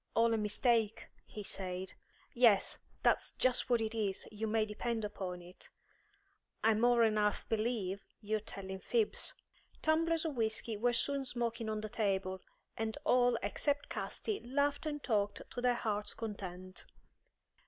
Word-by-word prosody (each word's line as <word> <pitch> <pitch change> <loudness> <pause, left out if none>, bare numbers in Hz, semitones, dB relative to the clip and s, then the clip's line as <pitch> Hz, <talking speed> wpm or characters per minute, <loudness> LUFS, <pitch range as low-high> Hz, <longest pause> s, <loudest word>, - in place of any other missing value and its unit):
"All 230 0 +4
a - - +2
mistake," 220 +1 +1 0.2
he 210 - -7
said. 185 -1 -4 0.4
"Yes, 235 -5 +4 0.2
that's - - +3
just 255 0 +1
what 240 -2 +4
it 220 0 -1
is, 205 -4 -1
you 220 +1 -3
may 220 0 +2
depend 220 +1 -2
upon 185 -4 -5
it. 180 +1 -12 0.9
I 225 - +6
more'n 230 -1 +4
half 210 -1 +1
believe 215 -4 -1 0.2
you're 215 0 -1
telling 190 -2 -7
fibs." 445 - 0 0.5
Tumblers 325 +1 +2
of 310 -3 -2
whisky 220 -1 -1
were 240 +4 +2
soon 275 +3 +1
smoking 235 -3 -1
on 215 -1 -2
the 215 - -3
table, 190 -3 -1 0.3
and 220 0 -2
all 245 0 +4
except 285 -1 0
Casti 420 -2 -2
laughed 285 +4 0
and 295 -1 -3
talked 205 -4 0
to 245 - -4
their 245 0 +3
heart's 210 -3 -1
content. 185 -4 -6
220 Hz, 145 wpm, -35 LUFS, 205-245 Hz, 0.9 s, I